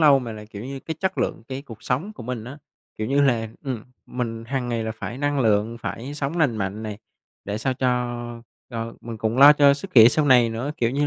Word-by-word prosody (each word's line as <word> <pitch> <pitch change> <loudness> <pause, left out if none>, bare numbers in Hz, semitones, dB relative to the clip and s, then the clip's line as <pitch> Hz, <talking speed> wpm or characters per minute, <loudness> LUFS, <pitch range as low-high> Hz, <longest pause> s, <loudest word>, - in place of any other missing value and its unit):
lâu 145 -3 +7
mà 120 -3 -5
là, 105 0 -9
kiểu 105 +1 -9
như, 135 0 -6
cái 160 - -5
chất 190 0 -1
lượng - - -1
cái 135 +1 -5
cuộc 115 -6 -12
sống 160 +13 -2
của 210 - -10
mình 120 -2 -4
á. 135 +4 -9 0.4
Kiểu 110 - -2
như 140 +2 +2
là, 115 -5 +2 0.2
ừm, 125 -5 -4 0.2
mình 115 -2 -4
hằng 125 0 -2
ngày 115 -2 -1
là 110 - -2
phải 120 +3 -6
năng 145 -1 0
lượng, 110 0 +2
phải 135 +5 -5
sống 145 +4 -3
lành 135 -8 +2
mạnh 100 +2 -3
này, 105 -1 -5 0.5
để 105 +1 -3
sao 130 +2 -1
cho 120 -2 -2 0.3
cho 115 -1 -4
mình 115 -1 -7
cũng 115 +3 -1
lo 145 +2 +10
cho 140 -1 +5
sức 185 +6 -8
khỏe 110 -2 +10
sau 150 +3 +1
này 125 -3 +6
nữa, 120 +6 -3
kiểu 115 -1 +1
như 145 +2 +1
125 Hz, 245 wpm, -24 LUFS, 115-140 Hz, 0.5 s, lo